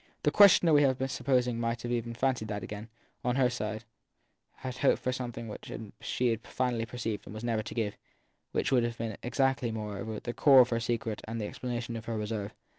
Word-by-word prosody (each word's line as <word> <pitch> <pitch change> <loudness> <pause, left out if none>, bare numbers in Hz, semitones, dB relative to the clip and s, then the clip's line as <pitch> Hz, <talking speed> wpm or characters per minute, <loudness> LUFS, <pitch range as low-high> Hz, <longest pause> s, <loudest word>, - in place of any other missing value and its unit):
The - - +3
questioner 185 -5 +7
we 145 - +7
have 130 -3 +3
been 130 - -1
supposing 125 -3 +1
might 115 +1 -2
even 120 -1 -2
have - - -13
fancied 130 -5 +1
that 105 -2 -4
each, 105 +1 -6 0.4
on 125 0 +1
her 130 -2 +3
side, 110 -1 -3 0.7
had 130 -1 -6
hoped 140 - +4
for 130 - +1
something 120 -2 -4
from 110 - -6
it - - -9
that 110 -3 -8
she 120 -2 +1
finally 120 0 -2
perceived 115 -3 -4
it - - -8
was 110 +1 -7
never 115 -2 0
to 110 - -8
give, 110 -4 -1 0.5
which - - 0
would 125 -3 +4
have 120 0 -2
been 110 -2 -3
exactly, 130 -1 +1
moreover, 105 0 -4
the 120 - -5
core 135 -1 +7
of 125 - +3
her 115 - 0
secret 115 -2 -2
and 115 +1 -3
the 105 - -2
explanation 120 0 -4
of 115 0 -6
her 115 -1 -2
reserve. 105 -1 -3
115 Hz, 220 wpm, -30 LUFS, 110-125 Hz, 0.7 s, questioner